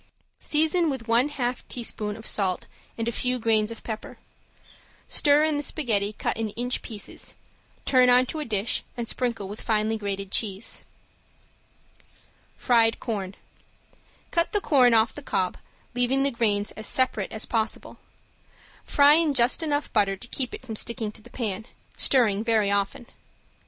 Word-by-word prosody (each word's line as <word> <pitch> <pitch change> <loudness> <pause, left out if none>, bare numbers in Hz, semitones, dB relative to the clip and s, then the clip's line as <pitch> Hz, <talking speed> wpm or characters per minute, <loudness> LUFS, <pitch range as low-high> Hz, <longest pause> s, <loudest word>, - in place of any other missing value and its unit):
Season 320 +2 +2
with 260 -5 -4
one 235 +5 +3
half 250 -3 -3
teaspoon 215 -3 -4
of 220 - -11
salt 190 -3 0 0.3
and 230 0 -2
a - - +1
few 250 +2 -1
grains 220 -2 +2
of 230 - -9
pepper. 220 -1 -6 0.9
Stir 290 +1 +4
in 310 -1 +1
the - - -1
spaghetti 220 -10 -1
cut - - -2
in 225 -1 -2
inch 245 +1 -2
pieces, 215 -3 -7 0.5
turn 255 -2 +5
on 250 +1 +6
to 310 - -5
a 300 - -3
dish, 210 -2 +1 0.2
and 235 -1 -3
sprinkle 235 -6 -1
with 205 +2 -8
finely 220 0 0
grated 200 -1 -4
cheese. 205 0 0 1.7
~FRIED 230 -2 +3
CORN~ 200 -5 -4 1.0
Cut 335 0 +1
the 415 - +3
corn 255 -10 +4
off 220 +1 +3
the 290 - -8
cob, 185 -9 -1 0.4
leaving 250 +2 +2
the 280 - +1
grains 210 -4 0
as 215 - -5
separate 255 -6 +1
as 220 - -3
possible. 225 -1 -2 0.8
Fry 285 0 +5
in 315 -2 +3
just 245 +4 +3
enough 295 -2 -2
butter 195 -1 +2
to 240 - -9
keep 255 -3 -2
it - - -12
from 225 -3 -6
sticking 220 -1 -2
to 215 - -12
the 240 - -15
pan, 220 -3 -4 0.3
stirring 220 -6 +3
very 220 -3 +2
often. 200 +4 -1
230 Hz, 160 wpm, -25 LUFS, 215-260 Hz, 1.7 s, on